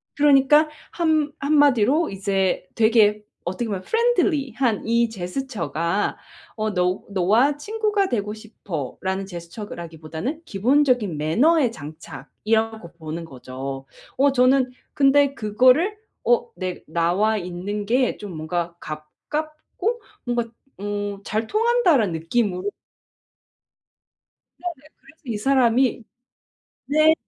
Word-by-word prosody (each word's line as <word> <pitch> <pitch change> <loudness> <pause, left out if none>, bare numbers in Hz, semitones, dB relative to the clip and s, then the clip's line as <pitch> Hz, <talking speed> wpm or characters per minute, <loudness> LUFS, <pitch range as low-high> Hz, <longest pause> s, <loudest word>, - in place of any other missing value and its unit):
그러니까 295 +1 +5 0.2
한 315 -3 +1
한마디로 285 0 +3
이제 195 -1 0
되게 220 -2 +4 0.2
어떻게 185 +7 -2
보면 195 -4 -3
friendly한 280 - +1
이 235 +1 +2
제스처가 200 - -2 0.4
어 215 -1 -2
'너 180 +1 +1
너와 215 +10 +3
친구가 420 +3 0
되고 210 -3 -1
싶어.'라는 190 - -5
제스처라기보다는 170 - -6
기본적인 245 - +2
매너의 245 - +3
장착이라고 170 - -3
보는 160 +1 -5
거죠. 135 -1 -7 0.3
어 275 +1 +4
저는 255 0 +3 0.2
근데 280 0 +4
그거를 255 - +3 0.3
어 485 -1 +3
내 185 -1 -5
'나와 175 +7 +1
있는 190 +3 -4
게 245 +3 +2
좀 205 -3 -8
뭔가 170 +2 -3
가깝고 305 - -5 0.2
뭔가 240 -1 0 0.3
어 205 0 -3
잘 220 +2 -1
통한다.'라는 410 - +3
느낌으로 185 +3 -1 1.9
네네. 355 -1 -4 0.2
그래서 320 0 -21
이 230 -4 -3
사람이 250 0 +2 0.8
네 310 +2 +5
220 Hz, 250 characters per minute, -23 LUFS, 180-280 Hz, 1.9 s, 그러니까